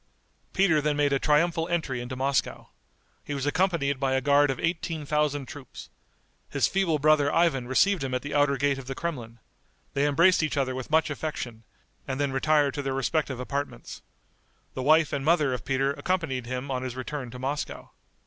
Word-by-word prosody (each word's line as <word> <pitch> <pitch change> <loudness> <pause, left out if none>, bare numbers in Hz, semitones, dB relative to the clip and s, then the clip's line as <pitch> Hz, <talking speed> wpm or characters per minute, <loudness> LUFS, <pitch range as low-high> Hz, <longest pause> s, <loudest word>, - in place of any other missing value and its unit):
Peter 175 -6 +3
then 150 0 0
made 145 -1 +2
a 135 - +2
triumphal 165 +3 +2
entry 150 -8 -2
into 125 +1 -6
Moscow. 135 +1 -1 0.5
He 145 - -4
was 135 -1 -3
accompanied 145 -4 +1
by 135 -1 0
a - - +3
guard 145 +2 +4
of 135 - -2
eighteen 165 -2 -2
thousand 145 -1 0
troops. 135 -2 -11 0.6
His - - +1
feeble 190 -5 +1
brother 145 -1 +3
Ivan 145 -8 +2
received 170 +6 +2
him 130 -1 -2
at 125 - -2
the 145 - -5
outer 145 -1 +3
gate 140 0 +1
of 130 - -10
the 135 - -4
Kremlin. 125 -9 -5 0.6
They 140 +1 +2
embraced 170 +6 +4
each 155 -1 -1
other 130 -2 0
with 130 -1 -6
much 160 0 +2
affection, 130 -7 -5 0.5
and 135 0 -3
then 140 -1 0
retired 145 +1 +2
to 145 - -3
their 135 -1 -2
respective 135 -1 -1
apartments. 140 +3 -5 0.7
The 130 - -4
wife 155 +3 +4
and 140 -1 -1
mother 150 -4 +3
of 125 -5 -5
Peter 135 +1 +1
accompanied 145 -9 -2
him 130 +2 -4
on 130 -1 -1
his 130 -1 -5
return 130 0 -5
to 125 - -9
Moscow. 135 +3 -4
140 Hz, 190 wpm, -27 LUFS, 130-155 Hz, 0.7 s, guard